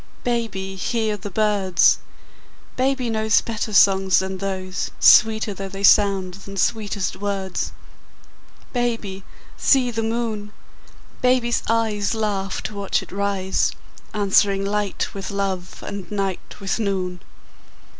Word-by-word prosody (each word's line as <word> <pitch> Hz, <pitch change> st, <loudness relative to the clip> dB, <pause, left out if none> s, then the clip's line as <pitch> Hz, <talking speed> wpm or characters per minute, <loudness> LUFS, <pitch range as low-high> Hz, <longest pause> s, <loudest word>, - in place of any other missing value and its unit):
Baby, 195 Hz, -6 st, -2 dB
hear 220 Hz, +1 st, -1 dB
the 205 Hz, 0 st, -7 dB
birds! 200 Hz, -2 st, +3 dB, 0.8 s
Baby 260 Hz, -1 st, 0 dB
knows 220 Hz, -1 st, +3 dB
Better 225 Hz, -1 st, -4 dB
songs 195 Hz, -2 st, +5 dB
than 190 Hz, 0 st, -1 dB
those, 185 Hz, -1 st, -3 dB
Sweeter 220 Hz, -2 st, +6 dB
though 195 Hz, 0 st, -6 dB
they 195 Hz, +1 st, -7 dB
sound 195 Hz, -3 st, +4 dB
than 195 Hz, +1 st, -10 dB
sweetest 205 Hz, -3 st, -1 dB
words. 195 Hz, -2 st, -3 dB, 1.0 s
Baby, 230 Hz, -6 st, -2 dB, 0.3 s
see 255 Hz, -3 st, +3 dB
the 225 Hz, -1 st, -2 dB
moon! 220 Hz, -2 st, -3 dB, 0.7 s
Baby's 250 Hz, -1 st, +2 dB
eyes 220 Hz, -2 st, +1 dB
Laugh 200 Hz, -3 st, -2 dB
to 215 Hz, -, -4 dB
watch 200 Hz, -1 st, -1 dB
it -, -, -14 dB
rise, 195 Hz, -1 st, 0 dB, 0.4 s
Answering 200 Hz, -1 st, +2 dB
light 205 Hz, -1 st, -2 dB
with 195 Hz, -1 st, -5 dB
love 195 Hz, -3 st, -3 dB
and 200 Hz, -2 st, -6 dB
night 195 Hz, -3 st, -4 dB
with 195 Hz, +2 st, -2 dB
noon. 185 Hz, -4 st, -2 dB
200 Hz, 120 wpm, -22 LUFS, 195-220 Hz, 1.0 s, Sweeter